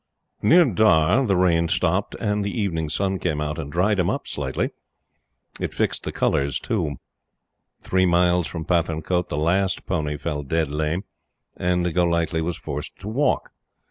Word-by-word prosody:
Near 170 +11 +6
Dhar 110 - +3
the 100 - +2
rain 85 -2 +3
stopped - - 0
and 105 0 0
the 100 +3 -3
evening 80 -7 -1
sun 95 +3 -1
came 80 -4 -1
out 75 +1 -3
and 70 -3 -5
dried 95 +5 +2
him 90 - +2
up - - -2
slightly. 70 -2 -2 0.9
It - - -4
fixed - - -1
the - - -2
colors, 70 +1 0
too. 85 -11 -2 0.9
Three 95 0 +2
miles 90 0 +3
from 80 -2 -5
Pathankote 85 0 0
the 75 - -3
last 95 +5 +1
pony 75 -5 -2
fell 75 -1 -3
dead 80 +2 -1
lame, 75 +5 -1 0.5
and 90 -1 0
Golightly 85 -1 +1
was 85 +1 -2
forced 75 -1 -6
to 95 - -7
walk. 130 +6 0
85 Hz, 160 wpm, -23 LUFS, 80-95 Hz, 0.9 s, Near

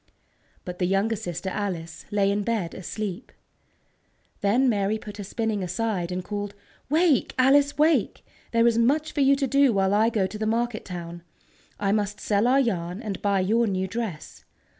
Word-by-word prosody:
_" - - -44 0.6
But 180 -1 -7
the 180 - +1
younger 195 +4 +1
sister, 180 -1 -5
Alice, 180 -5 -4
lay 200 -1 +2
in 205 +1 0
bed 205 -6 -2
asleep. 200 +3 -5 1.1
Then 235 +7 +2
Mary 205 -2 +1
put 210 -1 -10
her 205 - -5
spinning 215 +1 -2
aside, 185 -1 -2
and 180 0 -3
called: 205 +1 -5 0.3
"Wake, 315 -1 +2
Alice, 280 +3 +4
wake! 315 +2 +2 0.3
There 230 0 +3
is 230 -1 +3
much 295 +6 +2
for 290 - -1
you 275 0 +5
to 275 0 0
do 275 0 +4
while 195 0 +2
I 220 +2 +4
go 215 -4 0
to 200 +3 -6
the 215 - -1
market 230 0 -1
town. 175 -2 -7 0.6
I 200 -1 +1
must 205 -1 -1
sell 205 +2 +1
our 265 +2 +4
yarn, 180 -7 -1
and 205 -4 -5
buy 200 -2 +2
your 225 +5 +2
new 190 -1 -1
dress. 190 -7 -6
210 Hz, 180 wpm, -25 LUFS, 190-235 Hz, 1.1 s, you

